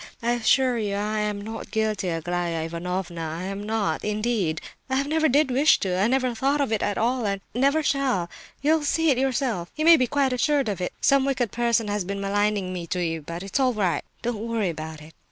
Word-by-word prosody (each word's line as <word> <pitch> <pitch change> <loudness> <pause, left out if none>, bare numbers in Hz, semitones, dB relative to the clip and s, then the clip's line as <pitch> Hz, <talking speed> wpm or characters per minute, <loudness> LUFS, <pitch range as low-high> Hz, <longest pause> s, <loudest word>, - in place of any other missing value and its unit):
I 235 - +2
assure 240 +1 +2
you 205 -2 -1
I 210 +1 -1
am 210 -1 -1
not 220 +2 -7
guilty, 215 -3 -1
Aglaya 170 0 -2
Ivanovna, 170 +1 -4
I 160 +2 -4
am 195 +1 -4
not, 205 -6 -1
indeed. 210 -6 0 0.3
I 265 +1 +1
never 315 +2 +1
did 280 +1 +3
wish 280 +5 +5
to—I 190 +1 +1
never 255 0 +1
thought 275 +5 +1
of 275 -5 0
it 220 - +1
at 205 - -1
all—and 225 -4 0
never 280 +6 +2
shall—you'll 275 - 0
see 325 +2 +2
it 255 - +1
yourself—you 265 - -1
may 335 0 +9
be 255 - +2
quite 275 0 +1
assured 275 0 +1
of 195 -3 -3
it. 180 - -2
Some 275 -1 +4
wicked 265 -5 0
person 235 -2 +1
has 205 -1 -1
been 200 +2 -4
maligning 200 -1 0
me 175 -2 -5
to 180 +2 -2
you; 165 -1 -2
but 170 +4 -6
it's 195 +8 -2
all 255 -2 +3
right. 195 -6 0 0.2
Don't 235 -2 -2
worry 225 -5 0
about 155 -1 -6
it." 160 +1 -14
215 Hz, 205 wpm, -25 LUFS, 185-260 Hz, 0.3 s, may